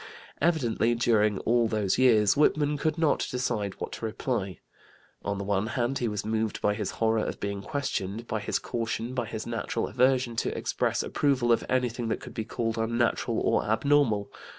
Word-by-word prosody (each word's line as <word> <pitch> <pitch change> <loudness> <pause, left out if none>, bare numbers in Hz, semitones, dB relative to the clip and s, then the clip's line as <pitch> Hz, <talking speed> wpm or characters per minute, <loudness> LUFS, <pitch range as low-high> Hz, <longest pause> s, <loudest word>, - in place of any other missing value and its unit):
Evidently, 120 -8 +2
during 110 -3 +2
all 120 0 +2
those 110 -1 0
years, 110 -6 +5
Whitman 150 0 +3
could 155 +2 -1
not 160 -2 +2
decide 115 -6 -2
what - - -4
to - - -5
reply. 110 -4 -2 0.7
On 100 0 -2
the 100 - -3
one 100 +1 0
hand 120 +3 -1
he 120 - 0
was 105 -2 -3
moved 110 0 -1
by 105 - +2
his 105 -2 -3
horror 110 -1 +2
of - - -4
being 100 -1 -3
questioned, 115 -4 -3
by 110 -1 -2
his 105 - -1
caution, 115 +1 -3
by 120 -3 -2
his 110 -1 -5
natural 115 -1 -2
aversion 125 -2 +2
to - - -1
express - - 0
approval 130 -4 +1
of 115 - +3
anything 125 -2 0
that 115 - -1
could - - -10
be 110 - -4
called 115 0 -2
unnatural 115 0 0
or - - +2
abnormal. 110 -1 +2
115 Hz, 180 wpm, -28 LUFS, 105-125 Hz, 0.7 s, years